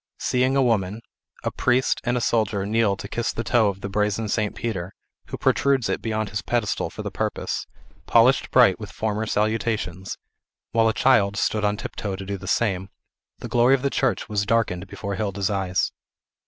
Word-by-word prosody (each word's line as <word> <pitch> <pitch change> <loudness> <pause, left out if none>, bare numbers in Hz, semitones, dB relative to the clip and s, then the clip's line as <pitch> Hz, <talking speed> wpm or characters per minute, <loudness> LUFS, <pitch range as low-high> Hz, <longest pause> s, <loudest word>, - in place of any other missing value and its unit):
Seeing 130 +1 +1
a 135 - +4
woman; 110 -2 0 0.4
a - - -1
priest, 130 +1 +1
and 120 0 0
a - - -1
soldier 110 -4 +1
kneel 105 -2 +2
to - - -7
kiss 120 -1 -2
the 115 - -4
toe 115 -3 +3
of 100 -1 -3
the 100 - -3
brazen 105 +2 0
St. 105 0 -1
Peter, 95 -5 -4 0.3
who - - -5
protrudes 135 -6 +2
it 95 - -1
beyond 110 -2 -2
his 100 -1 -2
pedestal 120 -4 -1
for - - -8
the - - -4
purpose, - - -3 0.4
polished - - +4
bright - - +5
with - - -7
former 110 0 -2
salutations, 105 -4 -1 0.5
while 115 0 +3
a - - +3
child 105 -6 +3
stood 105 0 0
on 105 0 +1
tiptoe 100 -1 -4
to 95 0 -7
do 100 +1 -3
the - - -9
same, 95 -4 0 0.5
the - - -7
glory 120 +3 +4
of 130 - -5
the 140 - +1
church 130 -3 0
was 105 -2 0
darkened 100 -4 0
before 100 0 -5
Hilda's 100 -2 -1
eyes. 95 -2 0
105 Hz, 190 wpm, -24 LUFS, 100-115 Hz, 0.5 s, bright